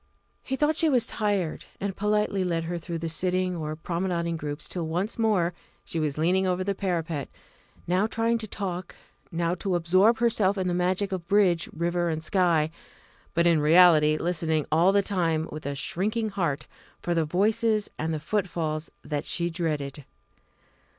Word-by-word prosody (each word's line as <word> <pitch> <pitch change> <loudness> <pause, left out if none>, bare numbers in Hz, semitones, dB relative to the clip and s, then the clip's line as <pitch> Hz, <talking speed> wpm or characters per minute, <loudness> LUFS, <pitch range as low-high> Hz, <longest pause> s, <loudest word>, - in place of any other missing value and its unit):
He 265 - -3
thought 300 +3 +2
she 320 +1 +4
was 250 -5 +3
tired, 205 -7 -1
and 195 -1 -3
politely 210 -1 +1
led 170 -2 -1
her 170 +1 -3
through 170 0 -5
the 165 0 -4
sitting 180 +2 0
or 155 -2 -4
promenading 170 0 -2
groups 145 -1 -5
till 170 -3 -4
once 180 +8 -2
more 195 -6 +2 0.3
she 165 - -3
was 150 -2 -1
leaning 185 +4 +2
over 180 0 0
the 200 +1 0
parapet, 170 -6 -2 0.6
now 185 +4 +2
trying 230 +1 0
to 220 - -5
talk, 185 -3 -5 0.4
now 170 0 0
to 185 +1 -1
absorb 185 +7 +4
herself 215 -4 +2
in 185 -1 -1
the 180 - 0
magic 185 +3 0
of 180 -3 -4
bridge, 190 -4 +3
river, 175 +1 -1
and 160 -1 -3
sky, 165 -4 +2 0.6
but 170 +1 +3
in 165 -3 +4
reality 155 -1 +6
listening 160 -2 0
all 170 +5 +5
the 200 0 +3
time 165 -5 0
with 155 -1 -6
a 140 - -2
shrinking 215 +9 -1
heart 170 -8 -2 0.3
for 175 - -1
the 165 -1 +2
voices 210 +6 +1
and 160 +1 -1
the 155 - -2
footfalls 165 -3 -2
that 145 -2 -3
she 170 0 0
dreaded. 150 -4 -3
175 Hz, 170 wpm, -26 LUFS, 160-195 Hz, 0.6 s, reality